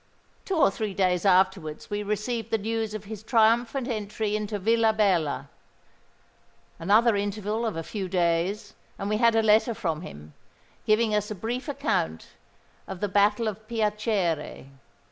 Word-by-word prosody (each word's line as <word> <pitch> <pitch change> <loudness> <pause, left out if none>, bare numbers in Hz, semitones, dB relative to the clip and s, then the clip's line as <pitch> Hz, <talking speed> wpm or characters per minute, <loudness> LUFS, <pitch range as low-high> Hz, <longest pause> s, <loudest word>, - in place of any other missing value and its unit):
Two 385 - -2
or 275 -10 +4
three 205 -1 -4
days 185 -1 +1
afterwards 185 -3 +1
we 205 0 -1
received 210 +2 -3
the 225 - +1
news 220 0 -3
of 210 - -6
his 210 0 -8
triumphant 230 +3 +2
entry 215 -2 -2
into 210 0 -2
Villabella;—another 215 -7 +2 1.7
interval 210 +3 -2
of 215 - -3
a 165 - -4
few 195 +1 -5
days, 180 +4 0 0.2
and 200 - -4
we 215 - +2
had 230 0 +4
a 225 - +3
letter 220 +2 +3
from 160 -5 -2
him, 75 - -11 0.5
giving 215 0 +3
us 210 0 0
a 215 - -4
brief 235 - -4
account 275 - -2 0.6
of 185 - -7
the 205 - -1
Battle 205 +3 +2
of 215 +1 -5
Piacere. 210 - -1
210 Hz, 145 wpm, -26 LUFS, 190-225 Hz, 1.7 s, or